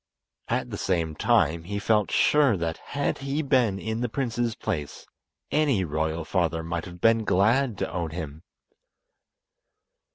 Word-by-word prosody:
At - - -1
the - - -5
same 85 -4 0
time, 80 +2 +2
he 100 +3 -3
felt 105 0 +2
sure 145 -8 +4
that 85 -1 -2
had 145 0 -3
he 140 +3 -2
been 125 -8 +2
in 110 +3 -3
the 125 - -1
prince's 120 -2 -1
place 75 -8 -4 0.5
any 145 -10 +2
royal 80 0 -2
father 85 -2 0
might 85 0 -3
have 90 -1 -10
been 115 +3 +4
glad 110 +5 +2
to - - -3
own 85 -2 -2
him. 80 -2 -6
100 Hz, 150 wpm, -26 LUFS, 85-120 Hz, 0.5 s, sure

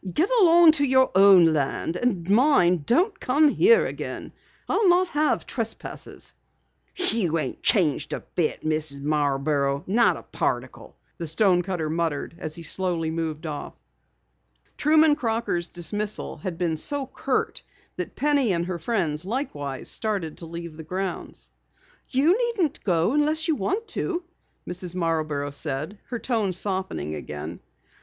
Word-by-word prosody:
"Get 350 +9 +1
along 340 -3 +7
to 290 -3 +1
your 260 -1 +3
own 190 -4 +7
land, 150 +3 -1
and 185 -6 -1
mind, 195 - +3
don't 365 - +2
come 295 +4 +3
here 450 +10 +5
again. - - -6 0.3
I'll 415 -5 +3
not 360 +1 +4
have 300 0 +1
trespassers." - - -6 0.6
"You 225 - 0
ain't 155 - -4
changed 165 - +2
a - - -3
bit, 165 -3 -2
Mrs. 155 -2 -1
Marborough, 140 -1 0
not 230 +5 +3
a - - -11
particle," - - -4 0.2
the 170 - -4
stonecutter 180 -1 +1
muttered 160 -2 -2
as 155 - -4
he 170 - -8
slowly 170 -2 -1
moved 160 -1 -3
off. 150 -2 -6 1.0
Truman 310 0 +4
Crocker's 225 -9 -1
dismissal 205 +5 -3
had 185 -4 -5
been 165 -3 -1
so 285 - -2
curt 260 - -2 0.3
that - - -5
Penny 280 -7 +2
and 170 0 -1
her 180 -1 -4
friends 165 -5 -1
likewise 150 - -4
started 200 -8 -3
to 165 - -8
leave 170 -1 -8
the 160 - -8
grounds. 185 +3 -5 0.6
"You 290 +8 +3
needn't 445 - -1
go 175 0 +2
unless 305 +3 +1
you 320 - +3
want 400 - -2
to," 355 -1 -3 0.4
Mrs. 180 0 -6
Marborough 155 -4 -1
said, 150 +7 -4
her 245 - -3
tone 225 -6 -1
softening 185 - -2
again. 75 -1 -6
185 Hz, 140 wpm, -25 LUFS, -, 1.0 s, along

